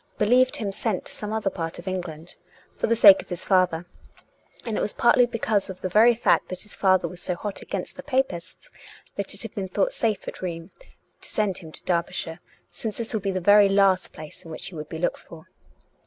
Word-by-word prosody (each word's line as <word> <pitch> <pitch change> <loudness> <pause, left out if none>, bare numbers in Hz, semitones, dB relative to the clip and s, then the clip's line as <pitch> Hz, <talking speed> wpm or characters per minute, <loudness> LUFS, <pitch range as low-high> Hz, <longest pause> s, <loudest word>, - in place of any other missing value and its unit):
believed 250 +5 +3
him 205 -3 -3
sent 200 -1 -2
to - - -1
some 210 0 -6
other 215 -3 -1
part 165 -2 -5
of 175 - -11
England, 175 -3 -5 0.4
for - - -1
the 230 - +2
sake 200 -4 +8
of - - -19
his 180 -1 -3
father, 180 -3 +2 0.8
and 225 -3 -2
it - - -1
was - - -1
partly 240 +1 +4
because 220 -4 -1
of 185 - -8
the 185 - -2
very 225 +5 +5
fact 230 - +2
that 185 - -5
his 210 - -8
father 185 -1 +2
was 180 -1 -9
so 180 - -2
hot 205 +3 -5
against - - -5
the - - -8
Papists 260 - -3 0.4
that 200 0 0
it 200 - 0
had 225 - -8
been 195 -4 -4
thought - - 0
safe 225 - -1
at - - -7
Rheims 170 -1 -5
to - - -12
send 205 -4 0
him 160 -3 -11
to - - -6
Derby 170 -2 0
shire, 165 +1 -4 0.3
since 220 -2 -5
this 230 0 0
would 220 - -1
be 195 - -2
the 185 -1 -1
very 205 +2 +6
last 195 -1 +3
place 155 +3 -11
in 165 - -12
which 170 +4 -3
he 180 - -12
would 150 -1 -7
be 160 - -6
looked 175 - -1
for. 160 -1 -14
195 Hz, 230 wpm, -24 LUFS, 175-215 Hz, 0.8 s, sake